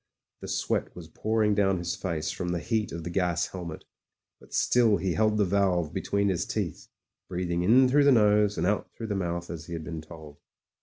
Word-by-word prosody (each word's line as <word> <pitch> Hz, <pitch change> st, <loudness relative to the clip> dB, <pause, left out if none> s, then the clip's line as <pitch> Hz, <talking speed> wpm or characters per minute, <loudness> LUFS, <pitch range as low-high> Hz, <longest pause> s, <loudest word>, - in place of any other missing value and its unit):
The -, -, -8 dB
sweat -, -, -2 dB
was 85 Hz, -2 st, -10 dB
pouring 110 Hz, +4 st, +1 dB
down 95 Hz, -2 st, +2 dB
his 85 Hz, 0 st, -3 dB
face 80 Hz, -5 st, -3 dB
from 90 Hz, -1 st, -4 dB
the 90 Hz, -1 st, -1 dB
heat 110 Hz, +3 st, -1 dB
of 85 Hz, 0 st, -6 dB
the 85 Hz, -, -5 dB
gas 85 Hz, -2 st, +1 dB
helmet, 85 Hz, -4 st, -7 dB, 0.5 s
but -, -, -19 dB
still 115 Hz, -4 st, +3 dB
he 90 Hz, 0 st, -1 dB
held 110 Hz, +1 st, +2 dB
the 105 Hz, -, +3 dB
valve 90 Hz, -4 st, +1 dB
between 100 Hz, 0 st, 0 dB
his 90 Hz, -3 st, -1 dB
teeth, -, -, -4 dB, 0.4 s
breathing 85 Hz, -1 st, -2 dB
in 125 Hz, +8 st, +5 dB
through 140 Hz, +3 st, +4 dB
the 140 Hz, -, +6 dB
nose 105 Hz, -3 st, +4 dB
and -, -, 0 dB
out 100 Hz, +2 st, 0 dB
through 115 Hz, -, -6 dB
the 105 Hz, -, -1 dB
mouth 85 Hz, -2 st, -3 dB
as 85 Hz, -1 st, -7 dB
he 85 Hz, -, -7 dB
had 80 Hz, -1 st, -4 dB
been 80 Hz, 0 st, -6 dB
told. 80 Hz, -2 st, -12 dB
90 Hz, 210 wpm, -27 LUFS, 85-105 Hz, 0.5 s, the